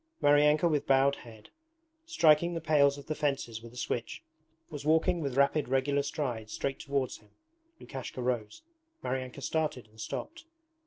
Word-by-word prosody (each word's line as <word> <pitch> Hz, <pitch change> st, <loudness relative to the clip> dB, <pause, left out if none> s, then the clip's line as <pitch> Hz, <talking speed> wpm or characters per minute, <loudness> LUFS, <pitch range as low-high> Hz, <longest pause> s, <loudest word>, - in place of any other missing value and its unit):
Maryanka 150 Hz, +3 st, +5 dB
with 150 Hz, -4 st, 0 dB
bowed 135 Hz, +1 st, +4 dB
head, 110 Hz, -3 st, -14 dB, 0.6 s
striking 170 Hz, -, +4 dB
the -, -, -1 dB
pales 145 Hz, -3 st, +3 dB
of 140 Hz, -, -10 dB
the 155 Hz, -, -2 dB
fences 135 Hz, -7 st, -2 dB
with 115 Hz, 0 st, -11 dB
a 125 Hz, -, -14 dB
switch, 120 Hz, -, -3 dB, 0.4 s
was 145 Hz, -2 st, -7 dB
walking 160 Hz, +3 st, +2 dB
with 135 Hz, -3 st, -3 dB
rapid 140 Hz, +1 st, +3 dB
regular 135 Hz, +2 st, +2 dB
strides 125 Hz, -7 st, -4 dB
straight 135 Hz, -1 st, -3 dB
towards 140 Hz, -2 st, -2 dB
him. 105 Hz, -, -24 dB, 0.5 s
Lukashka 130 Hz, -1 st, -7 dB
rose. 120 Hz, -, -2 dB, 0.4 s
Maryanka 130 Hz, +1 st, -4 dB
started 155 Hz, -7 st, -1 dB
and 110 Hz, +1 st, -13 dB
stopped. 330 Hz, -, -6 dB
140 Hz, 155 wpm, -30 LUFS, 125-150 Hz, 0.6 s, Maryanka